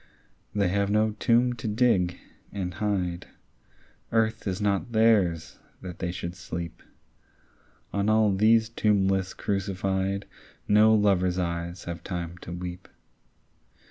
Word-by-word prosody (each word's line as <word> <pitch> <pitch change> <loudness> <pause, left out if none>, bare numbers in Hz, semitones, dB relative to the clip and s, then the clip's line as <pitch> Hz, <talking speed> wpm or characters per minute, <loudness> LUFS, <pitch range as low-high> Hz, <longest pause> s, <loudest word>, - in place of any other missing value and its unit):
They 100 -3 +2
have 100 +1 0
no 110 +1 +2
tomb 120 +1 +3
to 115 -2 -6
dig, 105 -6 +2 0.3
and 90 -3 -4
hide; 90 -3 -2 0.8
Earth 110 -1 +1
is 95 0 -2
not 105 +3 -1
theirs, 100 -8 +2 0.2
that 90 -2 -8
they 85 - -2
should 85 -1 -5
sleep. 85 -1 -7 1.1
On 100 +1 +1
all 110 -2 +4
these 110 +3 +4
tombless 95 -4 +1
crucified 95 0 -1 0.4
No 110 +1 +6
lovers' 95 -4 +2
eyes 85 0 -3
have 85 -1 -6
time 85 -1 -5
to 85 - -9
weep. 90 +1 -6
95 Hz, 120 wpm, -27 LUFS, 90-110 Hz, 1.1 s, No